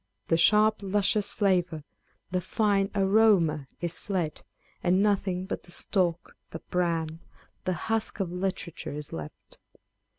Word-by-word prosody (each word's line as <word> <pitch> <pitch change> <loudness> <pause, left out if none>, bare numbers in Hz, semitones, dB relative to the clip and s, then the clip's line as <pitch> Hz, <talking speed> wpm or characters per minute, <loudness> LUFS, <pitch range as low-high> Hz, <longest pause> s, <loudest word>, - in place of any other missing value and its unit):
The 165 - +4
sharp 215 +5 +5
luscious 205 +1 +2
flavour, 180 -6 +1 0.5
the 180 0 0
fino 200 0 +1
aroma 195 -8 +3
is 175 -1 -2
fled, 180 -6 -2 0.4
and 180 +1 +3
nothing 190 -3 +1
but 190 - -4
the 175 - -15
stalk, 175 -2 -1
the - - -6
bran, 165 -3 0 0.5
the 185 - +1
husk 220 +4 -2
of 185 -3 -1
literature 180 -4 -4
is 150 0 -7
left. 75 -2 -9
185 Hz, 130 wpm, -28 LUFS, 165-200 Hz, 0.5 s, sharp